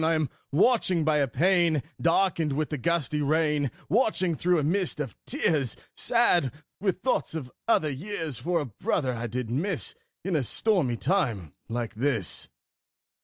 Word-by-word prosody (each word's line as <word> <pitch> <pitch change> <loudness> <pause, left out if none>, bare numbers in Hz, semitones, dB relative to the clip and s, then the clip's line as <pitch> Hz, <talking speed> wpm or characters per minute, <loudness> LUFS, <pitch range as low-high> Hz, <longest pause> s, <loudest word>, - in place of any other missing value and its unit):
I 165 +1 +3
am 155 -4 0 0.2
watching 185 - +3
by 155 -1 +3
a 140 -2 +2
pane 170 +2 +2 0.2
Darkened 165 -3 +2
with 155 +2 -1
the 150 - -2
gusty 150 +1 0
rain, 150 -1 +2 0.2
Watching, 190 - +2
through 175 +3 +2
a 150 - +1
mist 175 +2 0
of 135 -6 -4
tears, 155 - 0 0.2
Sad 180 - +3 0.3
with 190 -1 -1
thoughts 255 -9 0
of 130 -6 -5 0.2
other 155 -10 +3
years, 160 - -5
For 175 0 0
a - - -3
brother 130 - -1
I 120 0 -3
did 120 0 -4
miss 170 +8 -1 0.3
In 190 -3 0
a 150 - +2
stormy 140 - +1
time 115 - 0 0.2
like 115 -1 -3
this. 115 -4 0
155 Hz, 160 wpm, -27 LUFS, 135-180 Hz, 0.3 s, I